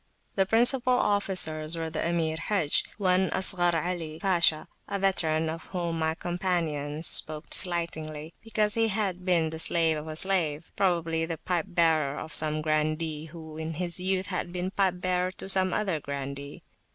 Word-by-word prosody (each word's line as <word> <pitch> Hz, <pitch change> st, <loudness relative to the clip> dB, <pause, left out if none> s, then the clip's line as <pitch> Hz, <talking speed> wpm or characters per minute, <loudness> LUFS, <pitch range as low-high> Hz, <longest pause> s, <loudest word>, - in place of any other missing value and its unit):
The 195 Hz, -1 st, +2 dB
principal 245 Hz, +3 st, +3 dB
officers 175 Hz, -8 st, 0 dB
were 165 Hz, -1 st, -4 dB
the 155 Hz, -, -2 dB
Emir 165 Hz, -2 st, 0 dB
Hajj, 165 Hz, -3 st, +2 dB
one 185 Hz, -2 st, +2 dB
Ashgar 180 Hz, -2 st, +2 dB
Ali 165 Hz, -2 st, -3 dB
Pasha, 170 Hz, -5 st, +3 dB, 0.2 s
a 200 Hz, -, -3 dB
veteran 165 Hz, -5 st, +1 dB
of 160 Hz, 0 st, -5 dB
whom 170 Hz, -3 st, -3 dB
my 160 Hz, 0 st, 0 dB
companions 165 Hz, -4 st, -2 dB
spoke 155 Hz, -1 st, +2 dB
slightingly, 160 Hz, -3 st, -1 dB
because 215 Hz, -2 st, 0 dB
he 225 Hz, 0 st, +2 dB
had 195 Hz, -4 st, 0 dB
been 170 Hz, -4 st, +2 dB
the 160 Hz, -, -6 dB
slave 165 Hz, -1 st, +2 dB
of 150 Hz, +1 st, -7 dB
a 155 Hz, -, -6 dB
slave, 165 Hz, -4 st, +1 dB
probably 165 Hz, -3 st, 0 dB
the 165 Hz, -1 st, -4 dB
pipe 170 Hz, +1 st, -2 dB
bearer 160 Hz, -5 st, +1 dB
of 155 Hz, -, -8 dB
some 155 Hz, 0 st, +5 dB
grandee 155 Hz, 0 st, -1 dB
who 160 Hz, -1 st, -10 dB
in 160 Hz, 0 st, -4 dB
his 175 Hz, +1 st, -3 dB
youth 185 Hz, +1 st, 0 dB
had 180 Hz, -2 st, -3 dB
been 180 Hz, +1 st, -3 dB
pipe 190 Hz, -3 st, 0 dB
bearer 180 Hz, 0 st, 0 dB
to 190 Hz, -, -8 dB
some 190 Hz, -1 st, +3 dB
other 190 Hz, -6 st, -1 dB
grandee. 140 Hz, 0 st, -7 dB
170 Hz, 165 wpm, -27 LUFS, 155-185 Hz, 0.2 s, some